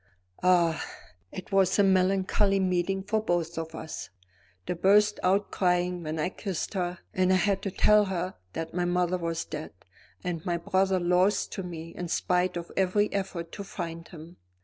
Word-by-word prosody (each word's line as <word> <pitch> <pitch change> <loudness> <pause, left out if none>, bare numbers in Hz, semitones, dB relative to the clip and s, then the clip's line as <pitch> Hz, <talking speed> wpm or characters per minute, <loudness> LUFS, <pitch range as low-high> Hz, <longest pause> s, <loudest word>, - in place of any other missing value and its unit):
Ah, 175 -3 +3 0.5
it 185 - -8
was 195 -1 +3
a 205 - +5
melancholy 195 +1 +3
meeting 185 +1 0
for 215 +2 0
both 175 -5 -1
of 160 0 -6
us. 160 - -6 0.6
She - - 0
burst 205 +4 +4
out 195 +2 +2
crying 180 -1 +1
when 155 -1 -4
I 155 +3 0
kissed 190 -1 -4
her; 180 -2 -2 0.2
and 185 0 +2
I - - +5
had 195 +1 +1
to 195 - -2
tell 210 +2 +4
her 185 -1 -2 0.2
that 165 0 -5
my 180 0 0
mother 180 0 +1
was 165 -1 -2
dead, 155 0 -6 0.5
and 170 -3 -3
my 175 -1 0
brother 190 +2 +1
lost 180 +3 +2
to 195 - -4
me 165 -2 -7
in 175 - -4
spite 180 +1 +1
of 170 0 -6
every 195 +2 +2
effort 190 -4 -3
to 200 - -6
find 170 -3 -6
him. 170 +1 -12
180 Hz, 175 wpm, -28 LUFS, 170-195 Hz, 0.6 s, a